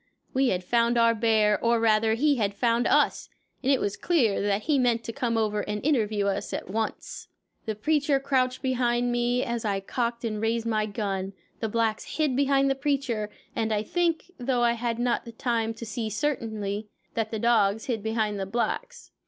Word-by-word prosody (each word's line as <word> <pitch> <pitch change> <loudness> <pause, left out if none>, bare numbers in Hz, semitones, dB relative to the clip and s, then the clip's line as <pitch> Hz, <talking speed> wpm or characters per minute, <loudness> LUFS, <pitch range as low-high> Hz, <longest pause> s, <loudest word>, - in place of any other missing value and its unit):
We 265 0 +3
had 185 -6 0
found 235 +4 +2
our 230 0 +5
bear, 220 -2 +2
or 235 0 +3
rather, 220 0 +3
he 285 +3 +2
had 200 -3 0
found 235 +2 +2
us, - - +2 0.3
and 270 - +2
it 270 - +3
was 205 - -1
clear 250 - +1
that 205 +1 0
he 295 -3 +2
meant 235 -2 +2
to 230 - -5
come 235 -3 -1
over 210 -1 0
and 210 +1 -3
interview 215 -8 +1
us 200 0 -2
at - - -4
once. 220 +3 -4 0.4
The 220 - -1
preacher 290 +4 +1
crouched 260 -1 0
behind 245 -2 +1
me 240 +1 +1
as 235 -1 -3
I 200 -3 0
cocked 235 +4 -2
and 215 -2 -2
raised 225 +1 0
my 215 -2 0
gun, 195 -2 -3 0.3
the 220 - -2
blacks 225 -1 -1
hid 300 -5 +1
behind 275 0 +3
the 270 - +3
preacher, 270 -6 -1 0.3
and 225 -1 0
I 210 -1 +1
think, 345 +5 -1
though 245 -1 0
I 235 - +4
had 235 -1 -2
not 240 -1 -1
time 230 -2 0
to 230 - -7
see 220 0 -3
certainly, 215 -5 -2 0.3
that 225 -1 -1
the 220 - -3
dogs 220 -2 +2
hid 230 -5 -2
behind 220 -1 -1
the 190 - -3
blacks. 485 - -3
230 Hz, 195 wpm, -26 LUFS, 215-250 Hz, 0.4 s, our